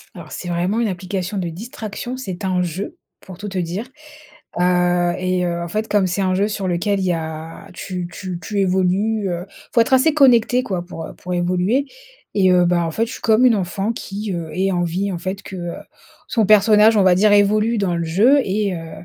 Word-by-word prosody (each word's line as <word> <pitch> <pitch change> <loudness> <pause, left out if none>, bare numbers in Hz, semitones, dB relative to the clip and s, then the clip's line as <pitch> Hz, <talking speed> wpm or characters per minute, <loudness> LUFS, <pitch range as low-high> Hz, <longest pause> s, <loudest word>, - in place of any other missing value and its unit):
Alors, - - -11
c'est 175 - -6
vraiment 180 +6 0
une 220 - +1
application 185 +2 -4
de 180 - -2
distraction, 220 +6 -6
c'est 195 -6 -6
un 185 -1 0
jeu, 180 - -4 0.2
pour 185 -3 -11
tout 205 - -7
te 190 -2 -5
dire, 180 +6 -3 0.7
heu 180 -1 +2
et 185 -1 0
heu, 170 0 -2
en 170 - -5
fait, 215 +4 -2
comme 200 -3 +2
c'est 180 +3 -1
un 185 -1 +1
jeu 205 +3 +1
sur 200 -2 -3
lequel 195 +3 0
il 190 - -1
y 180 - +2
a 160 +3 -6
tu 180 -1 -5
tu 180 +1 -6
tu 205 +4 -3
évolues, 190 +2 +1 0.4
faut 235 - +3
être 230 +3 +3
assez 295 +4 +4
connecté, 250 -4 +4
quoi, 185 -8 -3
pour 165 -2 -7
pour 180 - -5
évoluer. 180 +9 +1 0.5
Et 190 -2 +4
heu, 180 -1 +4
bah, 175 -1 +2
en 165 - -3
fait, 225 +8 0
je 230 - -8
suis - - -9
comme 225 +3 +4
une 240 - +5
enfant 195 +3 -2
qui, 205 -1 -5
heu, 170 -2 -4
ait 190 +1 0
envie, 175 +3 -1
en 180 - -3
fait, 190 +3 -5
que 175 -3 -6 0.6
son 225 -4 +1
personnage 215 +1 +5
on 200 - +5
va 185 -1 +5
dire 210 +2 +4
évolue 210 +3 +3
dans 190 -4 0
le 170 - -1
jeu 210 - +4
et 200 0 -1
heu, 165 -1 -8
190 Hz, 215 wpm, -20 LUFS, 175-215 Hz, 0.7 s, une